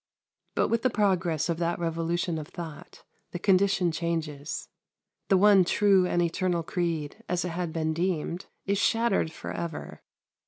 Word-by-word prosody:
But - - +2
with 230 0 +1
the 255 - +3
progress 180 - +1
of 170 -2 -1
that 170 0 0
revolution 165 0 -1
of 150 - -7
thought 160 -4 -9 0.3
the - - -2
condition 190 -1 +3
changes. 160 -3 -3 0.6
The 195 - +5
one 200 -1 +6
true 190 0 +4
and 175 -1 +1
eternal 170 0 0
creed, 165 +3 -3
as 180 0 0
it - - -2
had 170 0 -3
been 160 -1 -1
deemed, 175 +1 -2 0.2
is 200 0 +1
shattered 225 -7 +2
for - - -7
ever. 170 -3 -5
175 Hz, 155 wpm, -28 LUFS, 165-190 Hz, 0.6 s, one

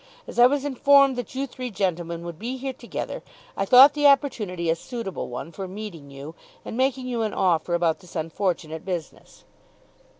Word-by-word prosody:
As - - -6
I 245 - +9
was 285 +1 -1
informed 275 0 +4
that 245 0 -6
you 270 +1 -1
three 255 -1 -6
gentlemen 175 -4 -2
would 170 -2 -7
be 245 +4 -4
here 265 +1 -4
together, 235 - -6 0.3
I 195 - -1
thought 260 +6 +8
the 290 0 +4
opportunity 220 - +1
a - - +1
suitable 230 0 -6
one 125 +7 -6
for 190 +4 -6
meeting 185 -7 -8
you 140 +3 -9 0.3
and - - -6
making 260 0 0
you 240 -2 -2
an 215 -2 -2
offer 175 -2 +1
about 170 -2 +1
this 180 -2 -16
unfortunate 160 -1 -2
business." 175 -5 -7
200 Hz, 180 wpm, -24 LUFS, 170-255 Hz, 0.3 s, I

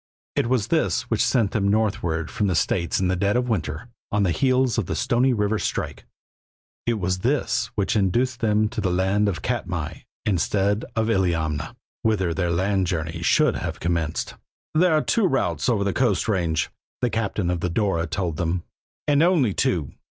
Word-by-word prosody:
It - - +1
was 125 -5 +1
this 160 -5 +1
which 110 - +2
sent 115 -7 +2
them 100 -2 0
northward 100 -6 0
from 105 - 0
the 90 - +1
States 85 +2 +1
in 95 - +1
the 95 - +1
dead 100 +5 +1
of 125 0 0
winter, 85 -5 -2 0.2
on 105 0 +2
the 90 - +2
heels 130 +2 +2
of 100 - -2
the - - -2
Stony 125 +1 +2
River 105 -2 +1
strike; - - -3 0.8
it 120 - +2
was 95 -2 -1
this 120 -1 0
which 100 0 0
induced 120 +5 +1
them 110 -1 +2
to 110 -1 -4
land 95 +3 +2
at 90 - -4
Katmai - - -3 0.3
instead 100 +2 +1
of 110 -1 +1
Illiamna, 85 -8 0 0.3
whither 95 -6 +1
their 90 0 -1
land 95 +2 +1
journey 85 -1 -3
should 85 - +3
have - - -4
commenced. 85 -3 -1 0.4
"There 170 +2 +4
are 155 - +1
two 225 -5 +2
routes 90 - 0
over 105 -5 +2
the 100 -1 0
coast 110 -10 +1
range," 85 -7 0 0.3
the 125 - +1
captain 105 -5 -1
of 90 - -1
the 90 - -1
Dora 85 -2 0
told 85 -1 -2
them, 85 +1 -1 0.4
"and 145 0 +4
only 165 - +3
two. 80 -7 0
100 Hz, 180 wpm, -24 LUFS, 85-115 Hz, 0.8 s, There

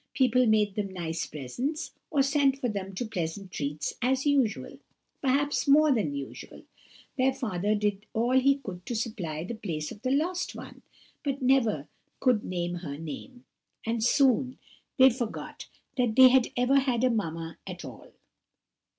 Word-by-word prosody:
People 255 -1 +3
made 210 -2 +3
them 200 -1 -3
nice 165 -3 -3
presents, 245 - -4 0.2
or 275 - +3
sent 275 -1 +2
for 260 - -2
them 195 -3 -4
to 240 - -2
pleasant 185 -2 -4
treats, 150 -1 -3
as 260 +3 +1
usual—perhaps 280 +2 -1
more 300 +2 +6
than 205 - 0
usual; 140 -1 -8 0.6
their 260 +1 +4
father 215 -6 -1
did 210 0 -1
all 235 +3 0
he 260 +2 +5
could 185 -9 -8
to 240 - -2
supply 195 -9 -3
the 195 - -5
place 165 -9 -4
of 205 - -10
the 255 - -1
lost 340 +7 0
one, - - -10 0.4
but 275 -2 -2
never 230 - +2 0.3
could 250 -5 +2
name 175 -1 -3
her 150 -5 -6
name; 165 - -8 0.4
and 225 0 -1
soon 260 0 +3 0.4
they 260 -1 +8
forgot 235 -2 -5 0.3
that 245 -4 +1
they 260 0 +9
had 255 -1 +4
ever 255 +3 +4
had 255 -3 0
a 255 - +5
mamma 165 -6 -3
at - - -7
all. - - -11
230 Hz, 160 wpm, -28 LUFS, 185-265 Hz, 0.6 s, they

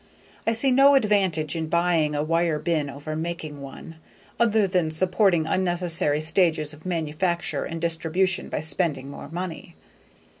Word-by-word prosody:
I 225 - +3
see 260 +4 +2
no 275 +2 +6
advantage 190 - +1
in 160 -1 -3
buying 170 -3 +1
a 145 - 0
wire 165 0 +1
bin 150 -2 -1
over 145 +3 -6
making 160 -3 -5
one, 140 +4 -10 0.4
other 220 -3 +3
than 180 -4 0
supporting 180 +1 +2
unnecessary 175 -4 +1
stages 160 -2 +2
of 155 +4 -11
manufacture 170 -2 -2
and 165 - -5
distribution 170 +3 0
by - - -3
spending 155 -4 -1
more - - -9
money. 175 0 -6
165 Hz, 145 wpm, -24 LUFS, 155-185 Hz, 0.4 s, no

